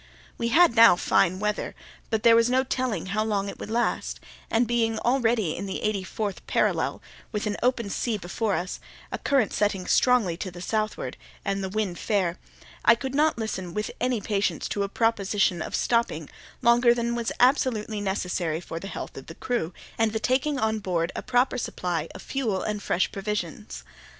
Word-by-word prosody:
We 235 - 0
had 305 0 +5
now 230 -4 +8
fine 180 +1 +2
weather, 210 0 -2 0.3
but 220 -1 0
there 230 -1 +7
was 230 +1 +4
no 260 +1 +3
telling 255 -5 -2
how 215 0 +1
long 205 -2 -1
it - - -9
would - - -6
last; 235 +2 -1 0.3
and 230 +2 +3
being 225 -1 +1
already 235 -8 +1
in 200 - -5
the 190 - -4
eighty 210 -3 0
fourth 200 +1 -4
parallel, - - 0 0.3
with 210 -2 -2
an 210 -1 -1
open 240 -5 +1
sea 230 +1 -1
before 200 +3 -1
us, 185 +1 -3 0.3
a - - -3
current 270 -6 +2
setting 200 -3 0
strongly 240 -9 +3
to 185 - -4
the 175 -1 -10
southward, 215 +3 -2 0.3
and 195 -1 -1
the 190 - -2
wind 195 -3 -2
fair, 185 -5 0 0.4
I 230 - +7
could 265 +3 -5
not 305 +1 +3
listen 190 -6 -4
with 210 0 -2
any 250 -2 +1
patience 200 -1 -1
to 205 - -1
a 200 - -1
proposition 200 -5 +1
of - - -3
stopping 230 -10 0 0.3
longer 235 0 +5
than 235 0 -1
was 235 -1 -2
absolutely 235 -5 +2
necessary 180 -5 -1
for 165 -1 -6
the 195 - -7
health - - -6
of - - -9
the - - -9
crew 235 -10 -2 0.3
and 225 -1 +2
the 220 - 0
taking 260 +5 +1
on 220 -3 0
board 175 -4 -1
a - - -3
proper 250 0 +1
supply 175 -7 -2
of - - -9
fuel 230 -9 -1
and 210 -1 -2
fresh 185 - 0
provisions. 175 - -4
215 Hz, 190 wpm, -26 LUFS, 190-235 Hz, 0.4 s, now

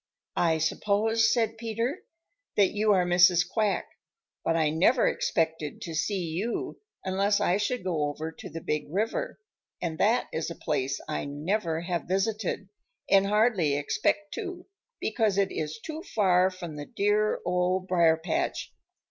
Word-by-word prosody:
"I 165 -2 +3
suppose," 215 +7 +2
said 225 -2 0
Peter, 230 - -2 0.6
"that 200 -2 +4
you 210 +1 +2
are 185 -3 +4
Mrs. 180 0 +5
Quack, 215 -3 0 0.6
but 165 - +1
I 155 -2 +2
never 190 +10 +3
expected 160 -2 -1
to 165 - -6
see 185 +3 -1
you 175 +8 -3 0.3
unless 200 +2 +2
I 180 - +2
should 210 +2 -1
go 160 -5 0
over 155 +2 -5
to - - -10
the 165 - -7
Big 150 -1 -2
River, 225 - -2 0.4
and 160 -2 -4
that 230 +5 +3
is 160 +1 -2
a 170 - -6
place 135 -3 -1
I 155 - -2
never 160 +3 -1
have 175 -1 -2
visited 195 +1 -1 0.4
and 195 0 +5
hardly 210 -8 +3
expect 200 +6 0
to 365 -4 -6 0.3
because 220 -3 0
it 200 -1 +2
is 155 +3 -3
too 315 +6 -7
far 185 - +3
from 175 -5 -8
the 145 - -6
dear 210 +1 +1
Old 180 +1 0
Briar 170 -3 +4
patch. 325 - -2
185 Hz, 155 wpm, -28 LUFS, 165-215 Hz, 0.6 s, Mrs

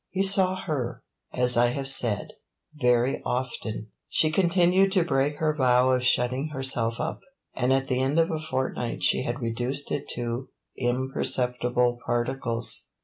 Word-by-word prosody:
He 190 +1 -1
saw 190 -1 +4
her, 140 -8 -4 0.3
as 125 0 +3
I 120 +1 +4
have 135 +3 -3
said, 120 -6 +2 0.4
very 125 -3 +1
often; 115 -4 -4 0.2
she 155 - +2
continued 185 +2 +3
to 185 -4 +3
break 145 -3 0
her 155 0 0
vow 130 -2 +3
of 125 -1 +1
shutting 125 +3 +1
herself 130 -5 +1
up, 155 - -3 0.3
and 125 +2 0
at 135 0 +1
the 130 0 0
end 135 +4 0
of 165 0 +2
a 160 - -2
fortnight 130 -5 -3
she - - +3
had 120 +3 -4
reduced 120 +5 -3
it 145 - -3
to 120 +2 -4 0.3
imperceptible 125 -1 0
particles. 120 -1 +1
130 Hz, 150 wpm, -25 LUFS, 120-150 Hz, 0.4 s, saw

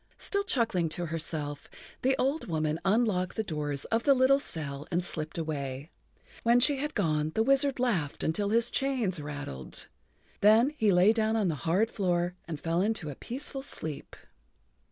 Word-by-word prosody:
Still 400 - 0
chuckling 225 - +1
to 175 - -2
herself, 155 -3 -4 0.3
the 265 +1 +3
old 275 +5 0
woman 155 -2 -1
unlocked 195 -3 +1
the 220 - 0
door 150 -6 -3 0.2
of 225 +1 +2
the 275 +2 +4
little 260 +2 +5
cell 145 - -3
and 175 +1 0
slipped 155 -1 -4
away. 145 -2 -4 0.5
When 235 +1 +4
she 270 +3 +2
had 295 +3 -3
gone 155 -5 0
the 220 - +3
wizard 275 +1 +2
laughed 185 - 0
until 200 +6 0
his 230 +2 +2
chains 245 - 0
rattled. 145 - -7 0.5
Then 220 +6 +5
he 220 -8 +3
lay 185 +4 +5
down 220 -1 +1
on 210 -5 +2
the - - 0 0.2
hard 210 +7 +2
floor 175 -3 0
and 160 -3 -5
fell 165 +2 0
into 200 -7 -1
a - - -8
peaceful 270 - -6
sleep. 155 - -5
190 Hz, 170 wpm, -29 LUFS, 155-235 Hz, 0.5 s, little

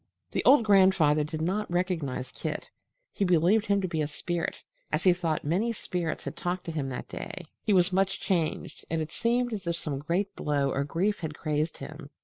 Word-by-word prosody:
The - - 0
old 270 -5 +7
grandfather 190 -7 +5
did 155 +1 -4
not 205 +5 -1
recognize 170 -8 -1
Kit. - - -5 0.4
He - - 0
believed 180 +5 +3
him 200 -1 +2
a 160 -5 0
spirit, 170 +3 -3 0.3
as 155 +2 0
he 185 - +6
thought 165 -3 -1
many 190 +10 +1
spirits 175 -7 -3
had - - -5
talked 180 +1 -2
to 165 - -3
him 145 -4 -2
that 125 - -5
day. 185 -3 -7 0.2
He 220 - 0
was 185 0 +4
much 195 +1 +2
changed, 170 -5 -1
and 165 - 0
it 155 0 -3
seemed 240 +1 +1
as 195 -5 -5
if 170 - +1
some 150 -5 -3
great 175 +7 -1
blow 140 -2 0
or 140 - 0
grief 190 +8 0
had 155 -3 -4
crazed 155 +1 -1
him. 155 -2 -9
175 Hz, 195 wpm, -28 LUFS, 155-195 Hz, 0.4 s, old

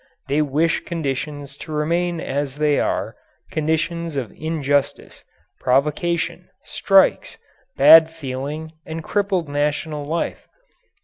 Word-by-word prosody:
They 145 +3 +1
wish 155 +3 +1
conditions 145 -3 -4
to 155 - -9
remain 170 +3 0
as 140 -2 -3
they 150 -1 +2
are, - - -1 0.4
conditions 160 +1 -1
of 125 -6 -3
injustice, 145 -3 -2 0.4
provocation, 150 +6 0
strikes, - - +2 0.4
bad 160 +3 +8
feeling, 150 +1 -6
and 160 0 -6
crippled 195 -4 0
national 150 +1 -2
life. 165 +3 -3
150 Hz, 105 wpm, -21 LUFS, 145-165 Hz, 0.4 s, bad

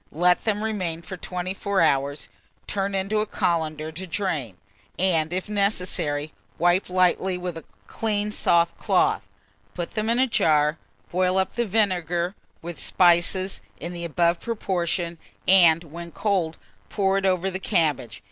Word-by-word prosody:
Let 175 +3 +3
them 210 -1 0
remain 180 -7 -2
for 190 +2 -7
24 185 +2 -2
hours, 140 -2 +1 0.4
turn 195 0 -2
into 195 +3 0
a 215 - 0
colander 160 -5 -1
to 185 +4 -7
drain, 160 - -2 0.4
and, 165 -4 +1
if 185 +2 -2
necessary, 180 -8 -1 0.2
wipe 175 +3 +2
lightly 185 0 +2
with 180 -1 -4
a 165 - -8 0.2
clean 210 -1 -2
soft 170 -4 +2
cloth. 185 - +1 0.5
Put 175 - -4
them 215 0 -2
in 235 - +2
a 260 - +4
jar; 155 - +2 0.3
boil 185 +1 +1
up 190 -1 +1
the 235 -1 -1
vinegar 180 -4 0 0.3
with 170 0 -7
spices 180 - +3 0.2
in 170 +3 -5
the 170 0 -4
above 170 +1 +1
proportion, 175 -6 -2 0.3
and, 170 -3 +6
when 170 +2 -9
cold, 180 -5 -1 0.3
pour 195 -1 +1
it 195 - -3
over 185 0 +1
the 190 - -4
cabbage. 150 -11 0
180 Hz, 145 wpm, -24 LUFS, 165-195 Hz, 0.5 s, and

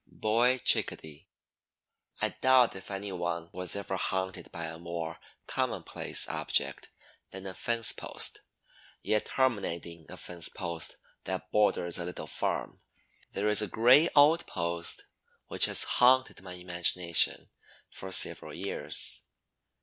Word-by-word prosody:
BOY 120 +4 +1
CHICKADEE. 80 - +1 0.9
I - - +2
doubt 130 -4 +3
if 95 - -9
any 100 0 -5
one 85 -2 -4
was 90 +1 -4
ever 100 -1 -4
haunted 95 0 -3
by 85 - -7
a 80 0 -8
more 85 -1 -6 0.3
commonplace - - -1
object - - -1 0.4
than 95 0 -10
a 95 - -5
fence 115 +3 0
post; - - -1 0.6
yet, 105 0 +1
terminating 85 -10 -2
a 90 - -9
fence 85 -2 -3 0.8
that 95 +1 -5
borders 95 -4 +1
a 85 - -2
little 90 -3 -6
farm, 75 - -4 0.5
there 100 +2 -1
is 105 0 +4
a 105 - -1
gray 125 - +5
old 150 +3 +6
post 85 0 -2 0.4
which - - +4
has - - +3
haunted 130 -2 +3
my 95 -1 -9
imagination 90 -1 +2 0.4
for 95 - -8
several - - 0
years. - - -1
95 Hz, 125 wpm, -29 LUFS, 85-110 Hz, 0.9 s, old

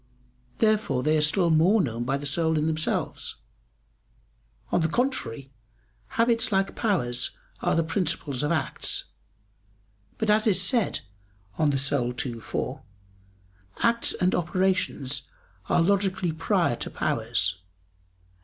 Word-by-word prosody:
Therefore 215 - +2
they 155 +1 +3
are 155 - +3
still 170 +3 +3
more 175 +8 +5
known 120 - -1
by 135 +2 0
the 145 - -7
soul 160 +2 +1
in 150 - +1
themselves. 155 0 -1 1.4
On 175 - +2
the 160 - +2
contrary, 150 - -2 0.7
Habits 230 -1 +2
like 195 0 +1
powers 130 - -1 0.2
are - - +1
the 165 - +3
principles 160 -5 -1
of 150 +1 0
acts. 155 -5 -1 1.1
But 220 -1 +1
as 215 +1 +3
is 200 - +4
said 235 - +1 0.5
(De - - -4
Anima 135 -4 +1
ii, 120 -3 -5
4), - - -4 1.0
"acts 235 0 +3
and 180 0 +1
operations 175 -6 -1 0.4
are 170 - +4
logically 190 -1 +1
prior 160 +1 +1
to - - -3
powers." 90 +1 -1
160 Hz, 125 wpm, -26 LUFS, 140-195 Hz, 1.4 s, more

